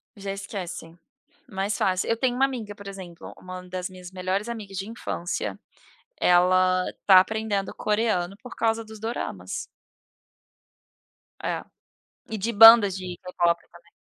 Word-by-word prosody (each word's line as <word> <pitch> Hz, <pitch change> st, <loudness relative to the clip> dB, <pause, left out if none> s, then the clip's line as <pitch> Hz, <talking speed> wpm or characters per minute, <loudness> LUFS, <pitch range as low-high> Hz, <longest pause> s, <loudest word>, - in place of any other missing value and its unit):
Já 195 Hz, -1 st, -5 dB
esquecem. 175 Hz, -4 st, -7 dB, 0.5 s
Mais 200 Hz, -1 st, -2 dB
fácil. 185 Hz, +2 st, 0 dB
Eu 230 Hz, -, +2 dB
tenho 245 Hz, 0 st, +1 dB
uma 270 Hz, +1 st, +4 dB
amiga, 225 Hz, -6 st, -5 dB
por 200 Hz, -1 st, -11 dB
exemplo, 185 Hz, -4 st, -9 dB
uma 185 Hz, 0 st, -8 dB
das 185 Hz, 0 st, -4 dB
minhas 180 Hz, 0 st, -11 dB
melhores 190 Hz, +3 st, -2 dB
amigas 205 Hz, -5 st, -6 dB
de 195 Hz, +2 st, -4 dB
infância, 185 Hz, -6 st, -4 dB, 0.6 s
ela 185 Hz, +1 st, +4 dB, 0.2 s
tá 190 Hz, -2 st, +9 dB
aprendendo 210 Hz, -1 st, -2 dB
coreano 210 Hz, -4 st, 0 dB
por 250 Hz, -, -9 dB
causa 225 Hz, 0 st, 0 dB
dos 215 Hz, -1 st, -12 dB
Doramas. 95 Hz, -, -4 dB, 1.8 s
É. -, -, -2 dB, 0.7 s
E 220 Hz, -, -3 dB
de 230 Hz, +4 st, -1 dB
bandas 225 Hz, -3 st, +9 dB
de 180 Hz, -1 st, -6 dB
k-pop 175 Hz, -2 st, +1 dB
também. 170 Hz, 0 st, -19 dB
195 Hz, 135 wpm, -25 LUFS, 180-220 Hz, 1.8 s, tá